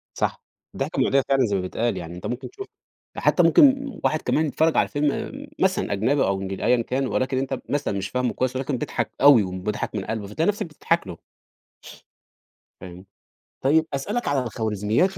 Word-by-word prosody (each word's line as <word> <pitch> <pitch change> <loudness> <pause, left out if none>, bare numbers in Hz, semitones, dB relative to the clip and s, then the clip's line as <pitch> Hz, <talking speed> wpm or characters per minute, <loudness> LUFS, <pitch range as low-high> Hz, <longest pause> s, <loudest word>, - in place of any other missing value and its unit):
صح - - -1 0.3
الضحكة - - -2
مُعديّة 135 0 +3
فعلًا 135 -2 +4
زي 100 -2 -1
ما 95 - 0
بيتقال 115 +6 -1
يعني، 85 0 -7
أنت 90 - -9
ممكن 120 +4 -4
تشوف 400 -1 -9 0.5
ده - - -5
حتى - - +4
ممكن 275 -4 +5
واحد 155 - +1
كمان 155 - +1
بيتفرّج 160 +2 +1
على - - +4
فيلم 145 -1 0
آمم - - -6
مثلًا - - +1
أجنبي 125 +8 +2
أو 95 0 0
إنجل 95 0 -5
أيًا 125 -1 +3
كان 130 +3 -1
ولكن 130 +1 -1
أنت 135 0 -2
مثلًا 140 -8 -1
مش 95 0 -3
فاهمه 125 -1 -1
كويس، 130 0 -1
ولكن 130 0 -2
بيضحك - - -3
أوي 140 -7 +8
وم 90 0 -5
بيضحك 105 +1 -3
من 100 - -3
قلبه 110 -2 -4
فتلاقي 160 - -1
نفسك 205 - -1
بتضحك 165 - -1
له. 85 -2 -7 1.6
فاهم؟ 90 +1 -10 0.6
طيب 155 +4 +3
أسألك 205 - -2
على 140 -3 +1
الخوارزميات 110 - 0
130 Hz, 190 wpm, -24 LUFS, 105-145 Hz, 1.6 s, أوي